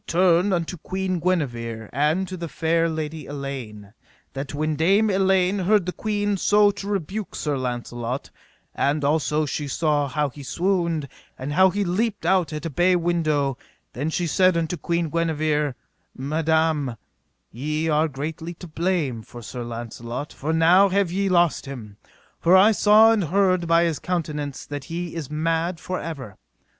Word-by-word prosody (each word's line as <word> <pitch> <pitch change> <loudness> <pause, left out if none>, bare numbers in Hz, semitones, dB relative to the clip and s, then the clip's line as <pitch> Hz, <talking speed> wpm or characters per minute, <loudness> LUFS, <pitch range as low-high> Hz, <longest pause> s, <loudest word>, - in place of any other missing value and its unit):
Now - - -4
turn 180 +2 +4
we 190 - +2
unto 170 +1 -3
Queen 185 +2 -2
Guenever 120 - -2
and 155 +8 +1
to 185 - -6
the 170 -1 -5
fair 165 +1 +1
Lady 155 0 -4
Elaine, 130 -8 -7 0.4
that 135 0 -5
when 155 +1 -1
Dame 195 +7 +3
Elaine 190 0 +2
heard 195 0 +3
the 180 - -2
queen 205 0 -1
so 205 +2 +4
to 200 0 -8
rebuke 200 +1 -3
Sir 150 -2 -1
Launcelot, 120 0 -4 0.4
and 145 +1 0
also 155 +1 +1
she 145 +1 -3
saw 145 0 +1
how 145 +2 -1
he 145 +2 -12
swooned, 170 -1 0 0.3
and 135 +3 -4
how 190 +3 +6
he 205 +2 -1
leaped 200 +4 -1
out 180 -5 +2
at 150 0 -5
a - - -1
bay 180 +6 +3
window, 155 -6 0 0.3
then 145 +5 -2
she 175 +2 -1
said 185 +2 +3
unto 165 +1 -1
Queen 170 -1 -1
Guenever: 155 -4 0 0.4
Madam, 155 -1 0 0.6
ye 150 +6 -2
are 155 0 +2
greatly 160 +4 -5
to 180 - -10
blame 160 -7 -1
for 120 +2 -11
Sir 125 +3 -6
Launcelot, 120 +3 -6
for 150 +3 -3
now 170 +5 +5
have 195 -2 +1
ye 195 +2 0
lost 175 -5 +2
him, 110 -7 -8 0.4
for 180 +3 +5
I 205 +4 +7
saw 215 +1 +6
and 210 -5 +1
heard 185 0 +2
by 165 +1 +4
his 165 -3 0
countenance 150 -6 -3
that 145 -2 -6
he 170 0 -5
is 160 -5 -5
mad 165 +3 -1
for 185 0 -4
ever. 140 -11 -7
160 Hz, 170 wpm, -23 LUFS, 145-185 Hz, 0.6 s, I